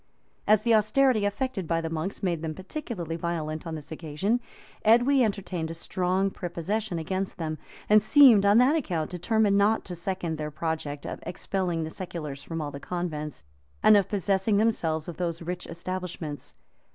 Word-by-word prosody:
] - - -40
As 215 0 +5
the 235 -1 +3
austerity 215 +1 +3
affected 205 -3 -2
by 165 0 +1
the 165 - -3
monks 165 +6 -4
made 170 -4 0
them 160 -1 -4
particularly 190 - -5
violent 160 -2 -3
on 160 - -4
this 150 0 -9
occasion, 165 +9 -1 0.4
Edwy 245 +4 +5
entertained 185 -6 -2
a 165 - -5
strong 185 +3 0
prepossession 185 +3 -3
against 185 +5 -3
them; 155 -3 -3 0.3
and 215 0 +6
seemed, 245 -4 +7
on 200 +2 +5
that 255 +6 +5
account, 175 - -2
determined 200 +3 +2
not 210 +2 +2
to 180 - -5
second 170 -2 -3
their 150 0 -3
project 150 -2 -4
of - - -5
expelling 180 -2 -2
the 160 - -5
seculars 155 -7 -6
from 165 +2 -5
all 145 -1 -4
the 140 - -7
convents, 155 - -4 0.4
and 215 - +8
of 200 -2 +3
possessing 200 0 +1
themselves 165 -8 +1
of 175 - -7
those 170 -2 -3
rich 180 +1 -5
establishments. 170 -3 -5
180 Hz, 175 wpm, -27 LUFS, 160-205 Hz, 0.4 s, and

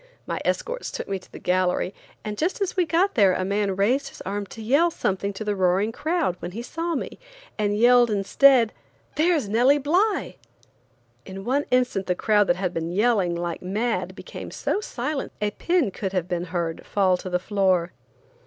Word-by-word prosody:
My - - -3
escorts - - -2
took - - -6
me 195 -1 -2
to 185 - -21
the - - -9
gallery, 180 +1 0 0.3
and 210 -1 -3
just 335 - -1
as 395 -2 -1
we 360 -3 +2
got 350 +6 +2
there 200 -8 +4
a 185 - -1
man 200 0 0
raised 245 +9 +1
his - - -14
arm 200 +1 -4
to 225 - -11
yell 280 +10 +3
something 200 - -2
to 195 - -6
the 210 -1 -1
roaring 190 +3 +2
crowd, 315 - -1
when 175 +1 -6
he 230 +3 -5
saw 330 +5 -3
me, - - -5 0.4
and 205 -1 0
yelled 240 +1 +5
instead: 230 +4 +4 0.4
"There's 315 - +2
Nellie 245 +7 +4
Bly!" 360 +10 0 0.9
In 195 0 -9
one 280 +4 +1
instant 250 -6 +1
the 180 - +1
crowd 210 +1 +2
that 175 - +3
had 180 -1 -2
been 165 -1 -3
yelling 200 -3 +2
like 170 0 -4
mad 215 +6 -2
became - - -8
so - - -2
silent 300 -8 -4
that 210 - 0
a - - -34
pin 340 - +1
could 190 0 -4
have 180 -2 -1
been 175 -1 -2
heard 170 -2 -3
fall 190 -3 +2
to 185 - -7
the 180 - +1
floor. 185 -2 +1
210 Hz, 195 wpm, -24 LUFS, 185-275 Hz, 0.9 s, yelled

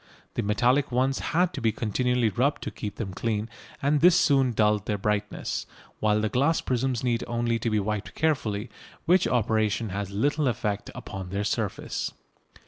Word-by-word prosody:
The - - -1
metallic 125 +6 +2
ones 130 +2 +1
had 175 +2 +1
to 145 - -5
be 115 -1 +3
continually 120 +2 +1
rubbed 130 +7 0
to - - -4
keep 105 -3 -6
them 100 -5 -4
clean, 110 +1 -1 0.4
and 145 +1 +2
this 175 +1 +7
soon 135 -3 +3
dulled 105 -2 +2
their 105 - 0
brightness, 105 +1 -2 0.3
while 105 0 +2
the 110 - +1
glass 140 +9 +2
prisms 130 -1 -1
need 120 -2 +1
only 120 -1 0
to 115 - -1
be 110 -1 +2
wiped 105 0 -3
carefully, 120 -9 0 0.3
which 180 +2 +4
operation 110 -2 +1
has 100 +1 -3
little 145 +9 +1
effect 105 -4 -2
upon 95 -3 -7
their 100 +2 -2
surface. - - -2
115 Hz, 170 wpm, -27 LUFS, 105-130 Hz, 0.4 s, this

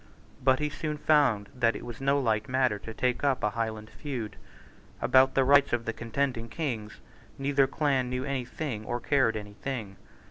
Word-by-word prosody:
But 130 0 +5
he 150 - -1
soon 150 +1 -3
found 140 -10 +3
that 120 -3 +2
it - - -7
was 120 +1 -8
no 140 +1 +3
light 110 -4 0
matter 130 -5 +2
to 115 - -8
take 125 +3 -1
up 135 -3 +1
a 105 - +2
Highland 110 -1 -4
feud. 125 -8 -5 0.6
About 130 0 +4
the 135 - +4
rights 140 0 +5
of 120 -1 0
the 115 - -2
contending 115 0 -2
Kings 115 -10 -4 0.4
neither 135 0 +2
clan 135 -3 0
knew 125 +1 -2
any 140 -2 -2
thing 125 -5 -4
or 120 +2 -3
cared 125 -3 +2
any 105 -1 -8
thing. 110 -5 -5
125 Hz, 185 wpm, -28 LUFS, 115-140 Hz, 0.6 s, But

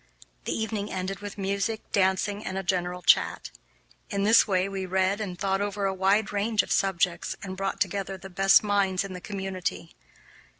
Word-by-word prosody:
The - - -2
evening 215 -2 -3
ended 190 0 -3
with 205 0 -8
music, 200 +3 -1
dancing, 200 +2 +1
and 190 - -4
a 195 - -2
general 180 -1 -1
chat. - - +3 0.6
In 200 -2 -1
this 220 +3 +6
way 185 -1 +1
we 195 -1 -4
read 190 +2 +1
and 185 -4 -4
thought 195 +1 0
over 205 0 -2
a 195 - +1
wide 195 +3 +2
range 210 +1 +1
of - - -9
subjects 180 -2 +1
and 190 -1 -5
brought 195 +1 -3
together 195 -1 -1
the 190 - -10
best 195 +2 +4
minds 200 -3 +1
in 195 -1 -7
the 180 - -7
community. 185 - -4
195 Hz, 180 wpm, -27 LUFS, 185-205 Hz, 0.6 s, this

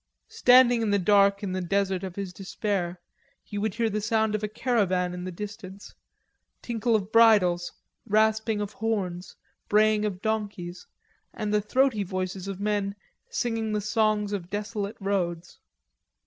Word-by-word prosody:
Standing 245 -1 +5
in 220 - 0
the 205 - +3
dark 200 +1 +3
in 195 - -2
the 185 0 -2
desert 190 +1 0
of 185 -2 -6
his 195 -3 -5
despair, 185 -1 -3 0.4
he 205 - -6
would 210 -1 -2
hear 230 -1 +1
the 215 0 -2
sound 220 0 +1
of 215 - -1
a 210 - -1
caravan 195 -6 0
in 180 0 -6
the 185 - -4
distance, 200 +1 -9 0.7
tinkle 235 -1 0
of 205 -1 -2
bridles, 205 -7 +4 0.4
rasping 220 0 +2
of 205 0 -4
horns, 190 -5 -3 0.3
braying 215 0 +4
of 200 -4 -2
donkeys, 200 -5 -4 0.5
and 210 -1 -2
the 210 - +3
throaty 250 +1 +2
voices 185 0 -4
of 195 -1 -5
men 205 -1 -1 0.3
singing 225 -2 -2
the 210 - +1
songs 215 0 +1
of 180 -3 -4
desolate 205 0 -4
roads. 180 -4 -2
205 Hz, 155 wpm, -26 LUFS, 185-220 Hz, 0.7 s, Standing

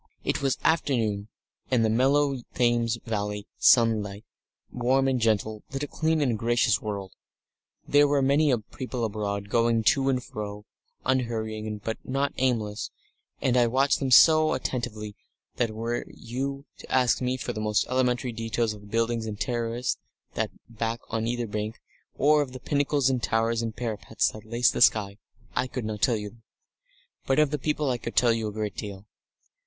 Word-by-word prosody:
It - - -1
was 135 -1 +1
afternoon, 115 -10 +1 0.4
and 120 -3 +3
the - - +2
mellow 135 +4 +3 0.2
Thames 120 -1 +2
Valley 105 -2 -3
sunlight, 110 -3 +3 0.5
warm 130 +2 +2
and 130 -2 +1
gentle, 110 -1 +1
lit 135 +1 -3
a - - -2
clean 160 0 0
and 120 -6 +1
gracious 120 -1 +2
world. 100 -3 -5 0.7
There 145 0 +5
were 140 -1 +2
many 140 +2 +3 0.2
people 125 -3 -3
abroad, 100 -2 -3
going 115 0 +2
to 135 +4 +3
and 130 -2 0
fro, 105 0 -7 0.4
unhurrying, 110 -4 -1
but 110 +1 -3
not 135 +2 -1
aimless, 115 -5 0 0.5
and 125 - +2
I 120 -1 +5
watched 135 +4 +2
them 135 - -1
so 155 +4 +7
attentively 110 -4 -4 0.4
that 120 - +1
were 115 +2 -3
you 135 +4 -5
to - - -12
ask 125 -2 +3
me 125 0 0
for 125 -1 -4
the 110 - -4
most 105 0 +1
elementary 125 -1 0
details 115 0 -1
of 105 - -11
the 105 - -14
buildings 115 +1 0
and 105 -1 -5
terraces 120 +4 -1 0.3
that - - -1
lay - - -28
back 115 +1 -1
on 115 0 -1
either 120 0 -1
bank, 105 0 -4 0.4
or 150 +1 +4
of 130 -3 -4
the 130 - -7
pinnacles 145 -1 +1
and 125 -2 -1
towers 115 +1 +1
and 115 -1 -4
parapets 115 -2 -1
that 110 0 -11
laced 115 +2 +2
the - - -2
sky, 100 -2 +4 0.4
I 125 +1 +1
could 125 -3 -5
not 105 -1 -4
tell 120 -4 +3
you 105 -1 -5
them. 115 -1 -22 0.8
But 135 - +2
of 150 -2 +4
the 150 - -1
people 150 0 0
I 120 - -2
could 115 - -6
tell 120 -2 +5
a 110 -2 -1
great 105 -2 -4
deal. 100 -1 -7
115 Hz, 175 wpm, -27 LUFS, 110-130 Hz, 0.8 s, so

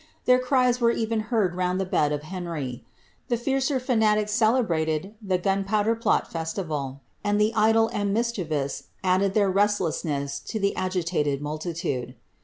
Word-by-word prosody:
Their 250 0 +5
cws 250 -1 +2
were 235 - +5
even 225 -1 0
heard 210 -7 +2
round 180 +1 0
the 190 - 0
bed 150 -5 +1
of 150 0 -2
Henry. 160 -8 -5 0.4
The 240 -2 +1
fiercer 265 +3 0
fanatics 215 -4 +2
celei'MiiJ 195 -7 +1
the 190 -3 0
Gunpowder 195 +4 +1
Plot 230 -1 +1
festival, 155 -5 -4 0.2
and 205 0 +1
the 215 +2 +2
idle 225 +1 +4
and 205 -1 -1
mischievous 180 - -1 0.2
added 190 +1 +2
ilit.r 200 -3 +3
re^di'ssness 165 -8 0
to 220 - -4
the 200 0 0
agitated 175 -6 -1
multitude. 150 -4 -4
195 Hz, 145 wpm, -25 LUFS, 160-220 Hz, 0.4 s, Their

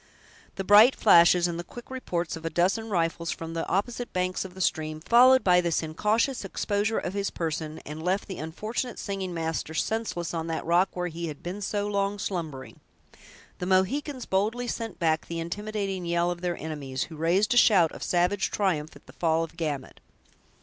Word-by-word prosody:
The 195 - -3
bright 210 +6 +7
flashes 175 -3 +6
and 170 -1 -4
the - - -4
quick 240 +8 -12
reports 175 -11 -3
of 160 - -9
a 165 - -1
dozen 195 +7 +1
rifles, 170 -3 -1
from 165 0 -5
the 165 - -3
opposite 235 +6 -2
banks 185 0 -1
of 185 -1 -10
the - - -10
stream, 155 -3 -1
followed 250 +8 +6
this 180 -3 +3
incautious 215 - 0
exposure 205 +3 -1
of 180 - -3
his 200 0 -1
person, 155 -1 -4
and 150 +2 -7
left 185 +4 -1
the 190 - -6
unfortunate 215 +10 -4
singing 195 -2 -4
master 160 -1 -3
senseless 215 -5 -2
on 165 -1 -3
that 165 -1 -3
rock 175 +3 +3
where 180 0 -2
he 170 +1 -5
had 150 -2 -8
been 185 +4 -5
so 205 +1 -1
long 200 0 -1
slumbering. 160 -10 -5 0.8
The 180 - -3
Mohicans 255 +9 +1
boldly 220 +6 0
sent 230 -3 -4
back 160 -2 0
the 170 0 -4
intimidating 195 +1 -3
yell 170 +1 +1
of 175 0 -6
their 175 -1 -2
enemies, 140 -4 -4
who 165 - -9
raised 175 +8 +2
a - - +1
shout 185 -9 +6
of - - -10
savage 180 +3 +1
triumph 160 -7 -1
at - - -16
the - - -15
fall 165 -1 +1
of 165 - -8
Gamut. 145 -5 -4
180 Hz, 190 wpm, -27 LUFS, 165-205 Hz, 0.8 s, bright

